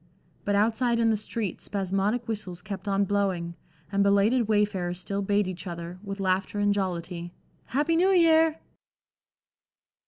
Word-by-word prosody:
But 205 - +1
outside 230 +3 +2
in 225 -1 +3
the - - +2
street 215 -1 -4
spasmodic 200 +4 -1
whistles 185 -6 -5
kept 195 0 -6
on 200 0 +2
blowing, 190 -4 -1 0.4
and 200 0 +1
belated 200 +4 +3
wayfarers 205 -5 +1
still 200 +2 -3
bade 205 0 +1
each 185 0 -6
other, 170 +1 -6
with 200 -1 -6
laughter 190 +1 0
and 205 0 +3
jollity, 175 -3 -3 0.3
"Happy 295 +6 +1
New 360 +3 +4
Year." 325 -3 +5
200 Hz, 145 wpm, -27 LUFS, 185-220 Hz, 0.4 s, Year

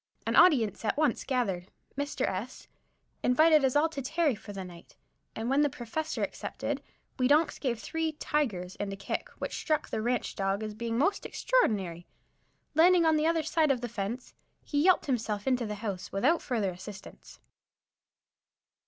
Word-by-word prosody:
An - - 0
audience 235 - +5
at 220 - 0
once 295 -5 +1
gathered. 195 -9 -1 0.3
Mr. 285 +1 -1
S 205 +7 -5 0.5
invited 310 +4 +5
us 265 0 +2
all 300 +2 +5
to 285 -4 -5
tarry 310 +2 +1
for 210 -1 -9
the 195 -1 -6
night, 175 -2 -13 0.4
and 225 +1 -3
when 275 +3 +3
the 295 - +3
Prof. 240 -4 -10 0.2
accepted, - - -3 0.4
we 255 - +4
donks 300 +3 +3
gave 245 -5 -1
three 320 +3 -2
"tigers" 220 -13 -2
and 205 -1 -2
a - - -4
kick, 195 - -4
which - - -4
struck 310 -2 -1
the - - -1
ranch 245 +2 -1
dog 195 +2 -1
as 215 -1 -4
being 230 +1 -3
most 390 +10 +1
extraordinary. 190 - 0 0.7
Landing 340 +2 +5
on 320 -1 +4
the 310 +1 +2
other 330 -1 +2
side 315 0 +2
of 260 -3 +1
the 245 - -2
fence, 230 +3 -5 0.3
he 290 -1 0
yelped 370 +3 +4
himself 220 -6 -1
into 255 -3 +1
the 210 - -4
house 200 -3 -5
without 265 +13 +2
further 220 -8 -1
assistance. 195 +2 -11
245 Hz, 170 wpm, -29 LUFS, 205-300 Hz, 0.7 s, audience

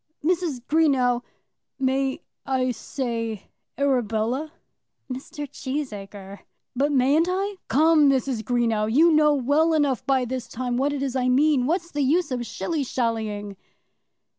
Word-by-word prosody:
"Mrs. 335 -7 0
Greenow, 260 -4 +2 0.6
may 265 0 0 0.2
I 255 -1 0
say 230 -3 -4 0.3
Arabella?" 255 +1 0 0.6
"Mr. 285 +3 -7
Cheesacre!" 205 -9 -6 0.4
"But 280 +4 +1
mayn't 285 +5 +3
I? 390 +2 -2
Come, 310 0 +4
Mrs. 265 -3 0
Greenow. 225 -2 0
You 325 +7 +5
know 300 -1 +4
well 295 +5 +2
enough 280 -6 +1
by 265 -2 +2
this 250 -1 -4
time 245 +1 -3
what 275 +4 +1
it 280 -1 -3
is 270 -2 -3
I 255 -1 +1
mean. 270 0 +3
What's 340 +2 -1
the 290 - -2
use 310 +4 +1
of 245 -1 -2
shilly 320 -4 -2
shallying?" 220 -5 -3
265 Hz, 135 wpm, -24 LUFS, 240-295 Hz, 0.6 s, You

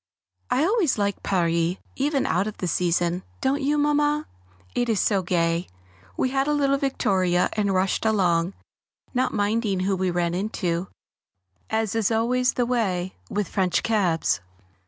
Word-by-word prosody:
I 275 - +2
always 380 - +2
like 200 -1 -1
Paris 170 -2 +1 0.2
even 275 0 0
out 185 +5 +1
of 215 - -6
the - - -3
season, 175 +1 +1 0.2
don't 275 +2 0
you, 290 +2 +1
Mamma? 295 +1 +2 0.5
it 245 -1 0
is 220 -4 +2
so 200 -3 +2
gay. 170 -1 0 0.5
We 260 - +1
had 270 +1 +1
a 300 - +2
little 275 -1 +2
victoria 185 -10 +1
and 205 -2 0
rushed 190 0 +1
along, 185 -5 +2 0.6
not 255 0 +1
minding 205 -2 0
who 195 +1 +1
we 185 0 0
ran 175 -1 0
into, 180 -2 -2 0.8
as 220 -2 0
is 225 -3 +1
always 245 +3 +1
the 245 - +1
way 190 -7 -1 0.2
with 205 -2 -1
French 185 -2 0
cabs. 170 - +1
205 Hz, 155 wpm, -24 LUFS, 180-250 Hz, 0.8 s, I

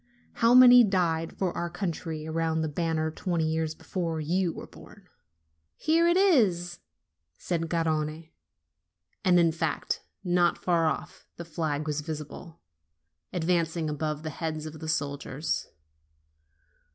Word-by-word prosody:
How 230 +1 +4
many 250 -1 +9
died 170 -5 0
for 185 -3 -1
our 175 - -2
country 165 -4 -4
around 160 0 -1
that 155 -2 -3
banner 160 -1 -1
twenty 170 0 -2
years 160 0 -1
before 165 -3 -3
you 175 +3 0
were - - -8
born!" - - -16 0.7
"Here 330 +2 +2
it 345 +1 +4
is!" 200 - +3 0.6
said 165 -2 -2
Garrone. 160 -1 -1 0.9
And 180 -2 +5
in 165 -1 +4
fact, 160 - -2 0.2
not 175 -1 +2
far 170 -2 +1
off, - - -4
the 170 - -7
flag 155 -2 -2
was 150 -1 -2
visible, 160 +2 -8 0.7
advancing, 165 -2 0
above 150 0 -3
the 155 - -4
heads 155 0 -4
of 155 0 -8
the 160 - -6
soldiers. 145 0 -2
165 Hz, 130 wpm, -28 LUFS, 155-175 Hz, 0.9 s, many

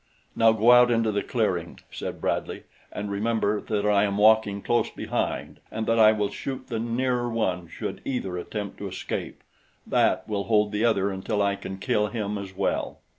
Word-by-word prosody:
"Now 115 0 +5
go 110 +2 +4
out 125 0 +7
into 115 -2 +2
the 100 0 0
clearing," 90 -8 -2
said - - -6
Bradley, - - -2 0.3
"and 105 0 -5
remember 105 0 0
that 105 -2 -2
I 105 -1 +4
am 100 -1 0
walking 105 -1 +4
close 120 0 +1
behind - - -3
and 110 0 -3
that 115 0 +2
I 110 -1 +8
will 105 -2 -1
shoot 130 -1 -6
the 115 -2 -2
nearer 120 +1 0
one 95 -7 -1
should - - -6
either 120 -9 -3
attempt 100 +3 -5
to - - -4
escape - - -5 0.4
that - - +2
will 100 -2 -2
hold 105 -2 +2
the 105 +1 -1
other 100 -4 +2
until 95 +2 -2
I 100 -1 +2
can 95 -1 -7
kill 105 -1 +1
him 105 -2 -3
as 95 -1 -8
well." 100 - -1
105 Hz, 185 wpm, -26 LUFS, 100-115 Hz, 0.4 s, I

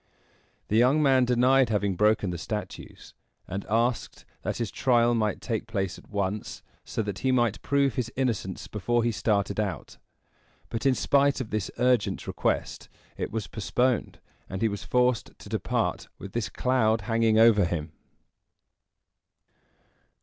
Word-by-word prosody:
The 110 - +2
young 130 +6 +4
man 130 -2 +4
denied 125 +1 +4
having 100 -3 0
broken 105 -1 +2
the 85 - -5
statues, 105 +3 -7 0.3
and 95 +2 -5
asked 115 +2 -1 0.2
that - - -3
his 115 -3 -3
trial 120 -2 +3
might 110 -3 0
take 115 -2 -3
place 95 -5 -3
at - - -20
once, 100 0 -3 0.2
so 110 - -3
that 100 -2 -5
he 130 - +1
might 120 -4 +1
prove 140 -2 +1
his 120 -1 -3
innocence 115 -8 -2
before 120 +3 0
he 120 - +1
started 100 -1 0
out; 95 - -4 0.7
but, 115 +4 -1
in 130 - +4
spite 140 +1 +2
of 125 -4 -5
this 105 -3 -2
urgent 125 -3 +1
request, - - -2 0.3
it - - -4
was 110 -2 -3
postponed, 120 +3 -1 0.3
and 95 +3 -4
he - - +4
was 100 -2 -4
forced 125 -1 0
to - - -12
depart - - -1
with 100 - -9
this 115 -6 -2
cloud 115 -1 +1
hanging 115 0 +2
over 110 -3 +6
him. 80 -2 -3
115 Hz, 150 wpm, -27 LUFS, 100-125 Hz, 0.7 s, over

